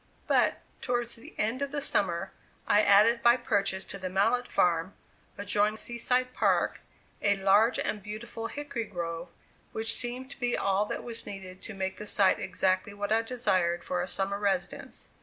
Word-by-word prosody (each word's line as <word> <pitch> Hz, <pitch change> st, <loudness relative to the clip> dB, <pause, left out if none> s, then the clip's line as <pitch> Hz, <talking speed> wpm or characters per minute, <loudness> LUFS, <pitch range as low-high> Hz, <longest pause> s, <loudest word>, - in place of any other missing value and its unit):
But, -, -, +2 dB, 0.2 s
towards 240 Hz, -1 st, -1 dB
the 230 Hz, -, -13 dB
end 225 Hz, +5 st, 0 dB
of 280 Hz, -, 0 dB
the 290 Hz, -, -1 dB
summer, 185 Hz, -9 st, 0 dB, 0.3 s
I 210 Hz, -, +5 dB
added 215 Hz, +4 st, +5 dB
by 235 Hz, +1 st, +6 dB
purchase 200 Hz, -5 st, 0 dB
to 195 Hz, -, -7 dB
the 185 Hz, -1 st, -4 dB
Mallett 230 Hz, +7 st, +1 dB
farm, 175 Hz, +1 st, +1 dB, 0.4 s
adjoining 205 Hz, +2 st, +1 dB
Sea 235 Hz, +1 st, -3 dB
side 255 Hz, +1 st, +1 dB
Park, -, -, +1 dB, 0.4 s
a 205 Hz, -1 st, +3 dB
large 200 Hz, +5 st, +4 dB
and 210 Hz, -, -2 dB
beautiful 220 Hz, +2 st, -6 dB
hickory 285 Hz, -4 st, -4 dB
grove, 170 Hz, -2 st, -5 dB, 0.4 s
which 225 Hz, +1 st, +1 dB
seemed 250 Hz, +3 st, -3 dB
to 275 Hz, -, -11 dB
be 245 Hz, -1 st, 0 dB
all 195 Hz, +1 st, +1 dB
that -, -, -4 dB
was 230 Hz, -1 st, -4 dB
needed 190 Hz, -2 st, -8 dB
to 220 Hz, -, -7 dB
make 190 Hz, 0 st, -3 dB
the 210 Hz, -, -8 dB
site 195 Hz, -2 st, +4 dB
exactly 185 Hz, +2 st, 0 dB
what 205 Hz, 0 st, -4 dB
I 225 Hz, +1 st, +4 dB
desired 185 Hz, -8 st, 0 dB
for 180 Hz, -1 st, -1 dB
a 180 Hz, -, -3 dB
summer 195 Hz, +2 st, -2 dB
residence. 195 Hz, -3 st, -2 dB
205 Hz, 175 wpm, -29 LUFS, 190-235 Hz, 0.4 s, by